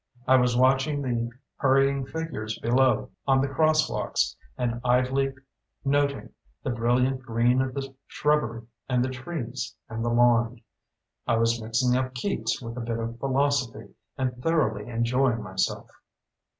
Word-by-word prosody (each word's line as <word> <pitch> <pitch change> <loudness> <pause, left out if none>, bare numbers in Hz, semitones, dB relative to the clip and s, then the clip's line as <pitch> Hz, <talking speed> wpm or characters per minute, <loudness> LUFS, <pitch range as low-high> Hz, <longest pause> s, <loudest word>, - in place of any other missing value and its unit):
I 130 - +6
was 125 -1 +3
watching 135 +3 +3
the 120 -2 -1 0.3
hurrying 135 0 +2
figures 135 -9 -4
below 125 0 +2 0.2
on 135 -1 +4
the 135 - +1
crosswalks 155 - +1 0.2
and 120 -1 -2
idly 130 +2 +2 0.5
noting 140 0 0 0.3
the 135 - -1
brilliant 125 +3 +1
green 120 +1 +2
of 130 -1 -3
the 135 -1 -4
shrubbery 135 -7 0 0.2
and 125 -1 +2
the 130 - -3
trees 130 -4 -5
and 115 0 -4
the 120 - 0
lawn. 120 -1 +3 0.7
I - - +3
was 115 0 +1
mixing 115 +3 +1
up 130 0 -1
Keats 150 +6 -1
with 115 +1 -7
a - - -3
bit 115 0 -2
of 115 +1 -5
philosophy 135 -2 0 0.2
and 130 -1 -1
thoroughly 125 -9 0
enjoying 120 0 +1
myself. 95 -2 -2
125 Hz, 140 wpm, -26 LUFS, 115-135 Hz, 0.7 s, I